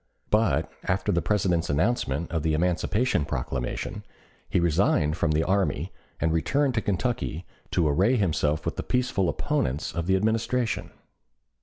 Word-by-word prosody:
But 85 -9 +2 0.2
after 95 +2 0
the 85 - +1
President's 90 -5 +1
announcement 80 - 0
of 80 -2 0
the 80 0 +1
Emancipation 90 - +1
Proclamation, 65 -2 -3 0.5
he - - +2
resigned 85 -2 +2
from 85 -1 0
the 75 +1 +2
army 95 +1 0 0.3
and 80 -1 +1
returned 135 - +1
to 110 - 0
Kentucky 100 -4 -2 0.2
to 85 -4 +2
array 95 - +3
himself 80 -7 0
with - - -2
the - - -1
peaceful 125 -8 0
opponents 65 +4 -1
of 85 0 -3
the 95 - +4
Administration. 110 -2 0
90 Hz, 145 wpm, -26 LUFS, 80-105 Hz, 0.5 s, the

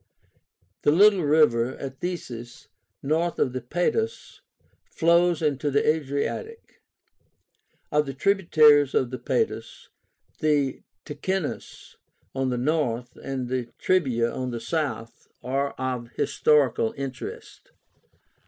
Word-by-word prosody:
The - - +3
little 195 +4 +5
river 145 -6 +3
Athesis, 130 -4 -7 0.3
north 160 +4 0
of 125 - 0
the 130 - -3
Padus, 175 - -2 0.4
flows 170 0 +2
into 145 -1 0
the 140 0 +1
Adriatic. 155 - -2 1.1
Of 150 -1 +2
the 135 - -5
tributaries 155 -5 +4
of 130 -1 +1
the 130 - -5
Padus, 445 - -2 0.5
the 145 -4 +1 0.2
Ticínus 170 +3 -5 0.4
on 135 -1 -1
the 125 - -1
north, 125 -3 -1
and 130 -2 -4
the 125 -1 -2
Trebia 130 -11 +1
on 130 -1 -3
the 120 -1 -4
south, 115 -6 -4 0.2
are 140 +2 -1
of 125 -2 -4
historical 130 -7 +2
interest. 135 -2 -7
140 Hz, 105 wpm, -25 LUFS, 125-160 Hz, 1.1 s, little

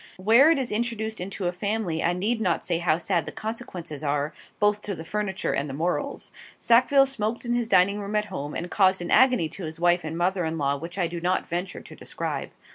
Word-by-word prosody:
Where 225 +10 +6
it 330 - +4
is 260 -3 -2
introduced 220 -1 -2
into 190 +1 -5
a 175 - 0
family 195 -3 -2
I 175 - +2
need 215 +6 -1
not 180 -5 0
say 170 -2 0
how 170 -2 +2
sad 170 0 -1
the - - -4
consequences 185 - -6
are, 145 +1 -1 0.3
both 205 0 +2
to 200 -2 -4
the 160 - -8
furniture 205 0 -2
and 140 +1 -1
the 135 - -5
morals. 180 - -2 0.3
Sackville 260 +4 +5
smoked 235 -3 -3
in 240 - 0
his 240 -1 0
dining 200 0 +4
room 205 +1 -4
at 210 0 +2
home, 150 -7 -6
and 175 +1 -4
caused 190 -2 +3
an 175 - -5
agony 250 -10 +5
to 185 - -7
his 160 +1 -7
wife 175 +1 +3
and 160 +1 -4
mother 180 +1 +1
in 160 0 -2
law 140 -2 +1
which 165 +6 -7
I 180 - +1
do 170 0 -5
not 180 +2 0
venture 175 +2 -4
to - - -13
describe. - - -4
185 Hz, 230 wpm, -25 LUFS, 170-220 Hz, 0.3 s, Where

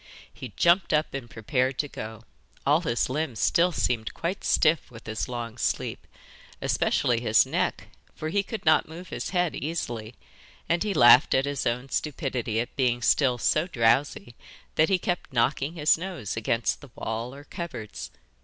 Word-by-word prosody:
He 130 - -8
jumped 170 +1 +3
up 150 0 +1
and 135 -4 -6
prepared 130 +4 -1
to 145 - -1
go: 110 -4 -8 0.4
all 150 +4 +4
his 120 -8 0
limbs 130 -4 -3
still 170 - +3
seemed 120 -8 -1
quite 175 +4 -3
stiff 160 0 +2
with 115 -2 -13
his 110 0 -3
long 120 -1 -5
sleep, - - -2 0.5
especially 120 -2 +1
his 110 -2 +4
neck, - - -2 0.3
for 155 - -4
he 200 +5 +1
could 215 0 -7
not 155 - +4
move 175 +3 -9
his - - -4
head 180 -3 0
easily, 120 -8 -4 0.5
and 170 +1 +1
he 210 -2 -1
laughed 120 +2 +7
at 135 - +2
his 140 -1 -2
own 125 +3 -2
stupidity 130 -8 -2
at 120 - -4
being 120 -3 +1
still 130 -2 +3
so 155 +7 +1
drowsy 120 -2 +1 0.4
that 155 - +3
he 190 - +3
kept 175 -3 -3
knocking 135 +5 +1
his 155 0 +3
nose 170 - -5
against 115 +1 -1
the 145 - -13
wall 115 +4 -4
or 140 - -11
cupboards. 155 - -7
135 Hz, 170 wpm, -26 LUFS, 120-160 Hz, 0.5 s, laughed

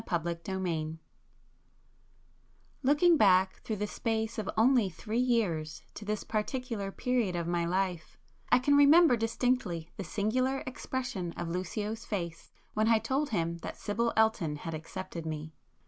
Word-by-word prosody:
[p - - -1
208]XVIII 170 -1 -2 1.8
Looking 295 +5 +5
back 190 -4 +4
through 220 - -3
the 210 0 -2
space 220 +1 -2
of 210 - -3
only 235 -2 +4
three 215 +7 -3
years 180 -12 0
to - - -8
this 210 0 -2
particular 220 -2 -3
period 240 -5 0
of 170 -1 -1
my 170 0 0
life, 180 -2 -2 0.3
I - - +7
can 285 +3 +3
remember 285 0 +7
distinctly 225 -7 -1
the 195 - -3
singular 255 +8 0
expression 245 -8 -4
of 165 - -4
Lucio's 205 +6 -3
face 170 -7 -5 0.2
when 215 +1 +2
I 225 -1 +5
told 265 +7 -1
him 170 -5 -1
that - - -7
Sibyl 230 +3 0
Elton 220 -9 +2
had 165 +2 -6
accepted 170 +2 -6
me. 155 0 -5
210 Hz, 145 wpm, -30 LUFS, 170-240 Hz, 1.8 s, I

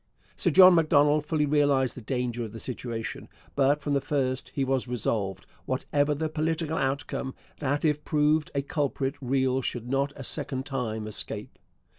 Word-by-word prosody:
Sir - - +1
John 185 -1 +8
Macdonald 150 -2 +4
fully 155 -2 +1
realized 140 -3 +2
the 125 - -8
danger 120 0 -2
of 110 -2 -7
the 115 - -7
situation, 115 -3 -5 0.3
but 140 +2 +3
from 145 - -1
the 140 - +2
first 130 -3 -1
he 140 - +1
was 130 -1 0
resolved, 100 -5 -2 0.2
whatever 145 +3 0
the 160 +2 -1
political 160 +1 -1
outcome, 135 -1 -2 0.2
that 145 +1 0
if 150 -1 +1
proved 150 0 +2
a 140 - +1
culprit 140 -2 -1
Riel 130 0 +1
should 120 -1 -4
not 135 +2 0
a 135 - -8
second 130 +1 -3
time 115 -6 -3
escape. 110 - -6
135 Hz, 165 wpm, -27 LUFS, 125-150 Hz, 0.3 s, John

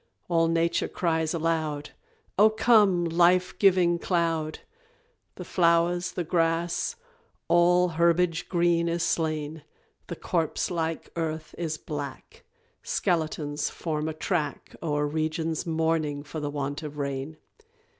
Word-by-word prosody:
All 165 -1 +3
Nature 165 0 +1
cries 160 -3 0
aloud 160 -3 -1 0.4
Oh, 210 +2 +6
come, 215 -5 +4
life 175 +2 +3
giving 180 -3 +4
cloud! 165 -3 0 0.8
The - - -8
flowers, 175 0 +2
the 180 - -2
grass, 165 - 0 0.5
all 175 +1 +4
herbage 170 +1 +1
green 170 -1 +2
is 170 0 -1
slain, 155 -2 -1 0.4
The 170 - -5
corpse 165 +1 -1
like 165 -2 -3
earth 160 -1 -3
is 160 -2 -3
black, 145 -4 -7 0.4
Skeletons 155 -3 -1
form 155 -2 -3
a - - -4
track 155 -3 -3
O'er 150 -2 0
regions 160 +2 -2
mourning 160 -3 0
for 145 +2 -6
the 145 -1 -3
want 145 +1 -3
of 150 -1 -7
rain. 140 +2 -4
165 Hz, 120 wpm, -27 LUFS, 155-175 Hz, 0.8 s, Oh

